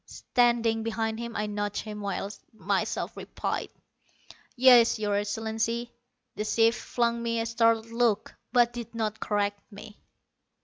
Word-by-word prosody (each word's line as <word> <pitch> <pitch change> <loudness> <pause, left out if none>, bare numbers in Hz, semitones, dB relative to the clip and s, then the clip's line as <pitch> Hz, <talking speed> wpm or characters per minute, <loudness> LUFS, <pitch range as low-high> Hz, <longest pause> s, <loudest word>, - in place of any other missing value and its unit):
Standing 235 -2 +1
behind 225 0 -2
him 235 -1 -6
I 210 - -1
nudged 205 0 -3
him, 210 -1 -7
while 200 -1 -2
I - - -21
myself 200 +2 -1
replied: - - -4 0.9
"Yes, 245 -3 +6
Your 210 -1 -1
Excellency." 225 +3 -2 0.4
The 210 - -2
chief 225 +2 +3
flung 235 +1 -1
me 230 0 -1
a 225 - -1
startled 230 0 +2
look, 230 -3 +1 0.2
but 240 -1 +4
did 235 -1 -7
not 220 -1 -2
correct 205 -1 -1
me. 210 +1 -12
225 Hz, 140 wpm, -28 LUFS, 210-235 Hz, 0.9 s, Yes